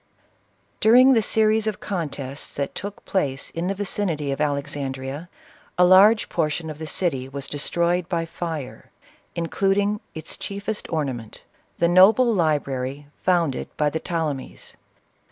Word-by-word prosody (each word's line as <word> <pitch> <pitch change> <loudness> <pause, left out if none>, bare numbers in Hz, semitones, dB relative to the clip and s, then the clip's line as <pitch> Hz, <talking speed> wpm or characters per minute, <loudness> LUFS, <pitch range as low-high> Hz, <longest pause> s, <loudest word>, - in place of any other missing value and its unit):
During 255 +4 +7
the 225 - +4
series 220 +1 +2
of 215 - -2
contests 145 -7 -4
that 140 -1 -3
took 200 +1 -7
place 140 -8 -1
in 170 +2 -3
the 195 - -1
vicinity 180 -7 -1
of 135 - -3
Alexandrea, 140 0 -3 0.5
a 180 - +6
large 200 +5 +6
portion 160 0 -1
of 150 - -10
the 160 - -5
city 135 -6 -1
was 140 0 -4
destroyed 170 +4 -1
by 170 -2 -1
fire, 160 -5 -6 0.5
including 195 +4 0 0.2
its 160 -1 -6
chiefest 205 +2 -5
ornament, 130 -9 -4 0.3
the 170 - +3
noble 210 +7 +6
library 145 -5 -1 0.2
founded 170 -7 +1
by 150 -1 +2
the 160 - -2
Ptolemies. 160 -6 -4
165 Hz, 135 wpm, -23 LUFS, 145-195 Hz, 0.5 s, During